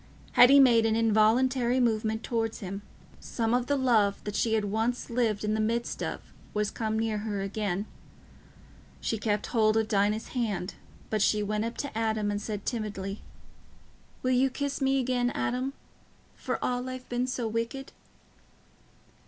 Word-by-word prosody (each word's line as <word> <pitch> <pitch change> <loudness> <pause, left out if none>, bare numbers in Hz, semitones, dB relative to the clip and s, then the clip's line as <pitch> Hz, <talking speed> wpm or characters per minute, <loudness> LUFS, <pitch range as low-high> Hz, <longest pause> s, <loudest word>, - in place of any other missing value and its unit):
Hetty 270 +3 +8
made 235 -4 +6
an 220 - +1
involuntary 235 +3 +3
movement 220 -2 +1
towards 225 -2 -1
him, 195 +1 -6 0.4
some 225 -1 -2
of 245 0 +1
the 285 - +2
love 225 -7 +2
that 210 -1 -5
she 225 +2 +2
had 215 -2 0
once 225 +4 -1
lived 225 -4 0
in 210 0 0
the 220 - 0
midst 230 +2 -1
of - - -5 0.2
was 210 0 0
come 220 -1 -2
near 220 -1 0
her 205 -2 -3
again. 200 -1 -2 1.1
She 225 - -2
kept 210 -1 0
hold 220 -2 +2
of 220 -1 +1
Dinah's 210 +1 +1
hand, 210 -7 -2 0.4
but 215 -1 +1
she 210 +1 +3
went 210 +1 -1
up 230 - -5
to 280 -5 -4
Adam 220 -2 0
and 205 0 -2
said 210 -2 -5
timidly, 205 -3 -4 1.0
"Will 255 - +1
you 260 +1 +3
kiss 280 +2 -3
me 270 0 +2
again, 250 -1 +1
Adam, 255 +2 -1 0.6
for - - -3
all 250 +1 -1
I've 255 0 -7
been 245 +1 -1
so 250 -2 -2
wicked?" 230 +5 -3
225 Hz, 160 wpm, -28 LUFS, 210-245 Hz, 1.1 s, Hetty